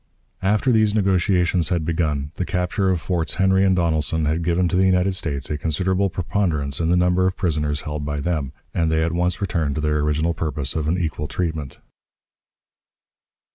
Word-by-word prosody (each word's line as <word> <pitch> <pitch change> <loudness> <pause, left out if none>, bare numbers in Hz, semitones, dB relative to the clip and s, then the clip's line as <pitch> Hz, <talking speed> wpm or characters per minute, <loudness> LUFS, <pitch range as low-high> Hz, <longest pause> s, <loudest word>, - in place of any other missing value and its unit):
After 105 +6 +2
these 110 -2 +3
negotiations 90 -4 +2
had 85 -3 0
begun, 75 -4 -1
the - - -3
capture 90 +2 0
of 90 -2 +1
Forts 85 -2 -2
Henry 95 0 +3
and 95 -1 +3
Donelson 80 -2 +1
had 80 +3 0
given 85 +2 +1
to 90 - -1
the 95 +1 +4
United 95 +1 +2
States 75 -7 -2
a 75 - -2
considerable 95 +5 0
preponderance 85 -6 -1
in 80 -1 0
the 90 - +3
number 90 +1 +3
of 95 - -2
prisoners 75 -5 -1
held 75 -1 -5
by 75 0 -3
them, 75 -4 -2 0.2
and 80 -1 +1
they 80 0 +2
at 85 - 0
once 90 +1 0
returned 80 -7 -1
to 80 - -2
their 75 0 +1
original 75 +3 0
purpose 75 -4 -3
of 80 -1 -1
an 85 +3 +1
equal 80 -3 -2
treatment. 80 -6 -3
85 Hz, 185 wpm, -22 LUFS, 75-90 Hz, 0.2 s, the